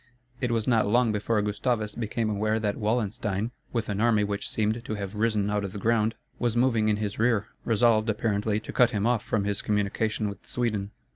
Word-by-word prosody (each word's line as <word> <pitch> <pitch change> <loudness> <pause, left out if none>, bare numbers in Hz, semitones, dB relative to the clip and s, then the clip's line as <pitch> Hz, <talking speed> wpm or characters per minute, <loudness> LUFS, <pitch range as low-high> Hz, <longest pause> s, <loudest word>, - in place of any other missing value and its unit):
It 125 -2 -1
was 115 -2 0
not 115 -4 +3
long 120 +2 +3
before 105 +1 0
Gustavus 105 +1 -1
became 115 0 -2
aware 110 +1 0
that 105 -2 -1
Wallenstein, 110 -1 -1 0.2
with 115 -2 -1
an 100 0 -2
army 115 -3 +4
which 100 0 -3
seemed 110 +2 -1
to 110 - -4
have 100 -1 -5
risen 105 -1 +1
out 105 0 0
of 100 -1 -5
the - - -5
ground, 110 +1 +1 0.2
was 120 -1 0
moving 115 -3 +3
in 105 - +2
his 105 -1 -3
rear, 115 -2 +2 0.2
resolved, 115 -1 +3
apparently, 105 -1 0
to - - -8
cut 125 -2 +5
him 105 -3 -1
off 120 -2 +2
from 110 -3 0
his 100 0 -1
communication 105 +1 0
with 100 - -7
Sweden. 110 -5 -1
110 Hz, 205 wpm, -27 LUFS, 105-115 Hz, 0.2 s, cut